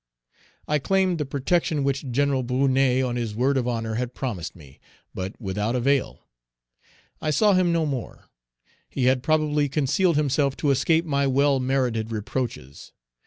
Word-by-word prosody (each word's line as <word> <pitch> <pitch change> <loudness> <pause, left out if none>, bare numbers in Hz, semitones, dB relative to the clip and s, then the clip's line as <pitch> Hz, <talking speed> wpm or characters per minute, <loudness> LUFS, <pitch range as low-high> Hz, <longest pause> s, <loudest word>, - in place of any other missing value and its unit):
I 150 0 +1
claimed 185 +2 +1
the 150 - -2
protection 145 +2 0
which 140 0 -1
Gen. 135 +1 +1
Brunet, 130 0 +2
on 120 -1 -2
his 115 -3 -3
word 130 +5 +1
of 125 -2 0
honor, 115 -2 -2
had 125 0 -5
promised 105 -11 -4
me, 70 -5 -16 0.3
but 95 +2 -6
without 105 +2 -2
avail. 135 +2 0 1.0
I 155 - -1
saw 205 +7 +3
him 185 -2 +3
no 165 -1 +1
more. 135 -5 -5 0.6
He 130 - -1
had 130 0 +3
probably 150 -1 +1
concealed 155 +5 +1
himself 140 -2 +1
to 145 - +1
escape 160 +5 +2
my 140 -3 +1
well 140 +1 +2
merited 125 -4 -1
reproaches. 110 - -5
135 Hz, 155 wpm, -24 LUFS, 120-150 Hz, 1.0 s, saw